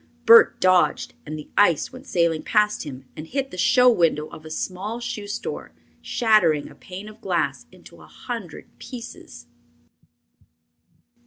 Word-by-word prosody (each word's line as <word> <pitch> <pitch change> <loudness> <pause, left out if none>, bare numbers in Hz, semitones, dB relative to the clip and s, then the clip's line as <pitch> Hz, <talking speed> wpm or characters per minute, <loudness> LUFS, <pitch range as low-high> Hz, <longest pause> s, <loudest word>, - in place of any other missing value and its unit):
Bert 230 0 +7
dodged, 185 -1 +2
and 155 +1 -5
the 150 - -11
ice 190 - +3
went 255 +2 -12
sailing 170 -5 +1
past 210 -4 +1
him 135 -2 -9
and 155 - -8
hit 270 +6 -3
the - - -8
show 250 +6 +5
window 165 -9 +3
of 155 - -12
a - - -8
small 195 +8 -4
shoe 240 -4 -5
store, 205 - -6 0.3
shattering 210 -11 +2
a - - -13
pane 190 +3 -10
of 215 +1 -13
glass 180 -6 -2
into - - -16
a - - -15
hundred 225 -10 -7
pieces. 230 - -10
195 Hz, 150 wpm, -23 LUFS, 160-230 Hz, 0.3 s, Bert